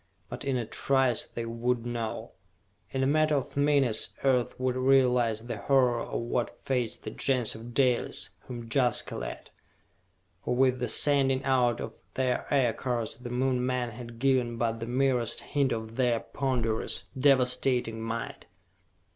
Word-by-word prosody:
But - - -6
in 135 -2 0
a 120 - -2
trice 130 +1 +1
they 115 - -6
would 115 +1 -1
know. 115 -2 -4 0.6
In 135 0 -1
a - - +3
matter 155 +2 +3
of 135 - -3
minutes 140 -5 +2
Earth 125 -3 +1
would 130 -1 0
realize 125 -4 +3
the 120 - -4
horror 125 -3 +3
of - - -3
what 120 0 -2
faced 125 -4 -1
the - - -5
Gens 125 -4 0
of 115 +2 -10
Dalis, 120 -6 +1 0.2
whom 120 -2 -7
Jaska 125 -1 +1
led! - - -6 0.9
For - - -1
with 130 0 +3
the 125 - -1
sending 135 -2 +3
out 125 -3 +2
of 110 - -5 0.2
their 130 -1 -1
Aircars 120 -4 0
the 125 0 -8
Moon 125 0 0
men 125 -1 -1
had 120 0 -9
given 125 -2 +1
but 115 -1 -1
the 115 - -5
merest 125 -2 +1
hint 140 -3 0
of 110 0 -4
their 120 -3 +2
ponderous, 120 -6 -2
devastating 125 -3 +2
might! 115 +1 -5
125 Hz, 155 wpm, -28 LUFS, 115-130 Hz, 0.9 s, a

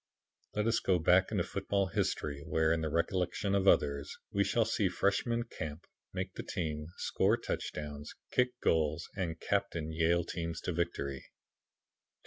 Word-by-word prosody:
Let 105 0 +1
us 115 - +3
go 95 -2 +3
back 90 +4 +4
into 100 -5 +1
football 100 +1 0
history 75 -3 -1
where, 80 0 +2
in 80 - 0
the 80 - -1
recollections 90 +4 0
of 100 0 +2
others, 70 -4 +3
we - - +3
shall - - +2
see - - +1
Freshman 115 +4 +1
Camp 80 -8 -6 0.3
make 95 0 -3
the - - -5
team, 75 -3 -3
score - - +2
touchdowns, 75 -1 -5 0.2
kick 125 0 +1
goals 80 0 +2
and 85 -4 -2
captain 90 -6 -1
Yale 85 +2 +2
teams 85 -1 -4
to 90 - -2
victory. 70 -5 -2
85 Hz, 150 wpm, -33 LUFS, 80-95 Hz, 0.3 s, back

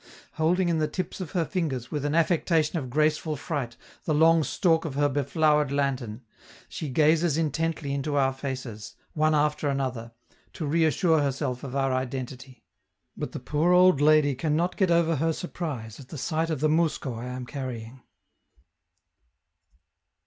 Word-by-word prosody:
Holding 175 +4 +1
in 165 -2 +1
the 155 - +1
tips 185 +4 -5
of 175 - -6
her 170 -3 +1
fingers, 140 -9 -3
with 145 -2 -2
an 145 +1 0
affectation 165 -1 +2
of 130 -4 -6
graceful 155 +3 +1
fright, 135 -5 -4 0.3
the 155 - +1
long 165 +1 +5
stalk 165 +1 +1
of 150 -5 -5
her 145 +1 +3
beflowered 145 +1 +1
lantern, 130 -5 -2 0.4
she 155 - -5
gazes 155 +3 +3
intently 160 -2 -1
into 140 +1 -2
our 135 -1 +2
faces, 130 -5 -6 0.2
one 155 0 +2
after 150 0 +1
another, 130 -4 -3 0.4
to 160 - -4
reassure 160 +1 +2
herself 135 -2 -2
of 135 -1 -6
our 135 -1 +1
identity; 130 0 -5 0.5
but - - -5
the - - -6
poor 150 +7 +1
old 180 -5 +5
lady 150 -1 +5
can 150 +4 -1
not 175 +3 0
get 190 -3 +2
over 170 -2 +3
her 165 +4 +1
surprise 145 - -6
at 135 - -12
the 155 - -8
sight 160 +5 -1
of 155 -4 -2
the 155 - +3
mousko 155 -4 0
I 120 - -6
am 125 0 -5
carrying. 125 -2 -7
150 Hz, 165 wpm, -26 LUFS, 130-160 Hz, 0.5 s, long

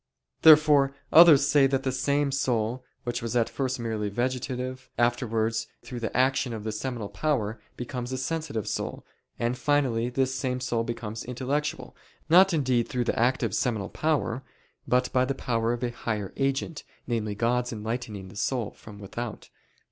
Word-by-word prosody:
Therefore 150 -3 +7 0.2
others 160 -4 +9
say 145 -2 +5
that 135 0 0
the 130 - 0
same 140 +2 +1
soul 125 -3 0 0.2
which 120 -1 -3
was 115 +1 -3
at 115 -2 +2
first 130 -1 -2
merely 110 -3 -2
vegetative, 130 +3 -3
afterwards 115 -2 0 0.2
through 125 - -6
the 115 0 -3
action 130 -1 +2
of 110 -2 -6
the 110 - -2
seminal 115 0 -4
power, 115 -6 -1 0.2
becomes 125 0 -5
a 130 - -2
sensitive 140 -5 -3
soul; - - -4 0.3
and 120 +1 -1
finally 130 -5 +1
this 130 +1 0
same 130 -1 -2
soul 120 -2 -1
becomes 115 -2 -5
intellectual, 140 +6 -3 0.3
not 185 +4 +7
indeed 130 -7 +1
through 125 -1 -1
the 115 - -1
active 125 +3 +1
seminal 110 -5 -1
power, 150 -5 -1 0.5
but 125 0 +1
by 125 - +4
the 135 +1 -1
power 115 -3 0
of 120 +1 -3
a 120 - 0
higher 110 -4 -4
agent, 135 +3 -1 0.2
namely 110 -4 -2
God 120 +3 0
enlightening 110 -3 -5
(the - - -13
soul) 115 0 -1
from 105 -2 -13
without. 105 +3 -7
125 Hz, 165 wpm, -27 LUFS, 115-135 Hz, 0.5 s, others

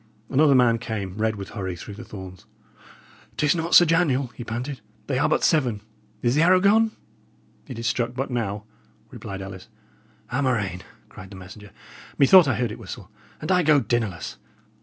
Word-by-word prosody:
Another 140 0 +4
man 120 -2 +4
came, 100 -5 -5
red 110 0 0
with 100 -2 -8
hurry, 95 -4 -5
through 100 +5 -9
the 110 +4 -9
thorns. 95 -4 -11 0.9
"'Tis 150 -1 +3
not 165 +1 0
Sir 175 - +9
Daniel!" 145 -6 +1
he - - -7
panted. 125 +4 -5 0.2
"They 135 -2 -1
are 145 - +2
but - - +1
seven. 125 -10 +2 0.4
Is 120 0 +2
the 150 - +3
arrow 185 +2 +5
gone?" 215 +3 +3 0.7
"It 115 -4 -6
struck 120 +1 -1
but 135 +1 -3
now," 105 -4 -2 0.5
replied 95 -1 -7
Ellis. 95 -1 -9 0.6
"A 130 +4 0
murrain!" 105 -9 -1 0.3
cried 95 - -12
the 100 - -11
messenger. 95 +3 -12 0.5
"Methought 165 +4 +7
I 130 - +1
heard 120 -3 -1
it 110 - -8
whistle. 105 -1 -9 0.3
And 155 - -2
I 180 -1 +4
go 155 -3 +4
dinnerless!" 110 -7 -2
120 Hz, 175 wpm, -24 LUFS, 100-145 Hz, 0.9 s, Sir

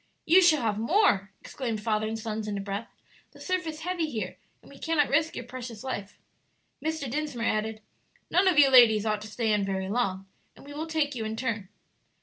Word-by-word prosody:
"You 355 +4 +6
shall 315 -7 +4
have 215 -2 0
more!" 230 - +3
exclaimed 235 -5 -4
father 215 -1 0
and 220 +1 -3
sons 220 -1 -4
in 205 -1 -2
a - - -3
breath; 200 +3 -4 0.5
"the - - -16
surf 370 -2 -2
is 310 0 -6
heavy 345 -2 -2
here, 215 -9 -4 0.3
and - - -16
we 275 - -14
cannot 320 -3 +1
risk 315 +4 +1
your 250 - -6
precious 245 -3 -8
life." 205 -7 -5 0.7
Mr. 315 -2 -2
Dinsmore 280 -3 -3
added, 215 0 -1 0.5
"None 375 +2 +4
of 360 -5 +3
you 280 -2 +7
ladies 225 -4 +7
ought 215 -1 0
to 215 - -8
stay 220 0 0
in 205 -1 +1
very 190 -1 -2
long, 195 -4 -1 0.3
and - - -16
we 285 - -10
will 310 +2 -4
take 310 -3 0
you 235 -3 -4
in 220 0 -3
turn." 225 -5 -3
235 Hz, 210 wpm, -27 LUFS, 215-305 Hz, 0.7 s, you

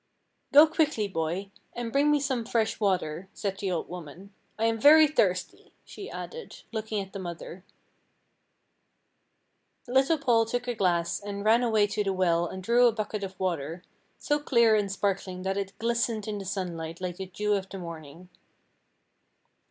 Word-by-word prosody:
"Go 295 +3 +9
quickly, 305 -9 0
boy, 180 +2 -3 0.2
and 240 -1 -4
bring 280 +3 +3
me 295 0 +4
some 265 -4 -1
fresh 225 -1 0
water," 185 -3 -1
said 195 -1 -3
the 195 - -2
old 175 -3 -2
woman, 180 +3 -10 0.2
"I 225 - 0
am 225 0 +1
very 310 +6 +8
thirsty," 185 -12 -1
she 410 +2 -9
added, 475 -1 -8
looking 220 -1 -3
at 190 - -21
the 195 - -5
mother. 175 0 -7 2.2
Little 265 +6 +3
Paul 230 -5 +2
took 245 +2 -3
a 245 - 0
glass 175 -5 0
and 200 0 -6
ran 225 +2 +5
away 220 -4 +3
to 205 +1 -1
the 195 -1 -1
well 175 -2 +2
and 190 +2 -7
drew 240 +4 +5
a - - +4
bucket 215 -1 -4
of 190 -1 -7
water, 170 -2 -3 0.3
so 295 0 0
clear 235 -6 +4
and 205 -2 0
sparkling 195 -2 -2
that 190 0 -1
it 195 -1 -4
glistened 230 -2 -1
in 210 -1 -3
the 195 - -7
sunlight 170 -4 -4
like 180 -1 -4
the 190 - -5
dew 210 +3 -1
of 195 -1 -2
the 195 - -7
morning. 170 -1 -9
200 Hz, 170 wpm, -28 LUFS, 185-235 Hz, 2.2 s, Go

